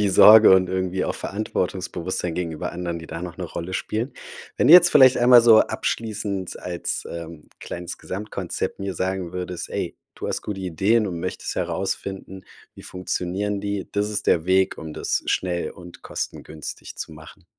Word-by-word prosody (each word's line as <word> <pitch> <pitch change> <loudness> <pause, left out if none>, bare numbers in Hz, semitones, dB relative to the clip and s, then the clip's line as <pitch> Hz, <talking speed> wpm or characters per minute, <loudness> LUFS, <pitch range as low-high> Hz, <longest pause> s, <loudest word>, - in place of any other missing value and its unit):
wie 105 - +2
Sorge 110 +2 +9
und 90 -1 +3
irgendwie 95 0 -1
auch - - -2
Verantwortungsbewusstsein 90 -3 -3
gegenüber 85 -3 -4
anderen, 85 -1 -4
die 80 - -10
da 85 +2 -7
noch 90 0 -7
'ne 90 - -3
Rolle 85 +2 -6
spielen. 110 +7 -3 0.4
Wenn - - +2
du - - +9
jetzt 175 -1 +8
vielleicht 130 -3 +7
einmal 120 0 +7
so 115 -2 +7
abschließend 105 -4 -3
als, 90 -1 -4
ähm, 85 -2 -8
kleines 90 0 -7
Gesamtkonzept 105 +3 -5
mir 95 -1 -3
sagen 95 -2 -2
würdest: 90 -1 -5
„Ey, - - -3 0.2
du - - -5
hast - - -3
gute 100 -2 -5
Ideen 100 +5 +1
und 85 -3 -4
möchtest 90 - -4
herausfinden, 95 -1 -4 0.3
wie - - -12
funktionieren 95 +2 -3
die. 100 -1 -3
Das 105 +1 -1
ist 105 -1 -3
der 80 -1 +3
Weg, 95 +1 +2
um 80 -1 -7
das - - -1
schnell 90 -2 -1
und 90 -2 -13
kostengünstig 75 -1 -7
zu - - -6
machen“. 80 +3 -14
95 Hz, 170 wpm, -23 LUFS, 85-105 Hz, 0.4 s, Sorge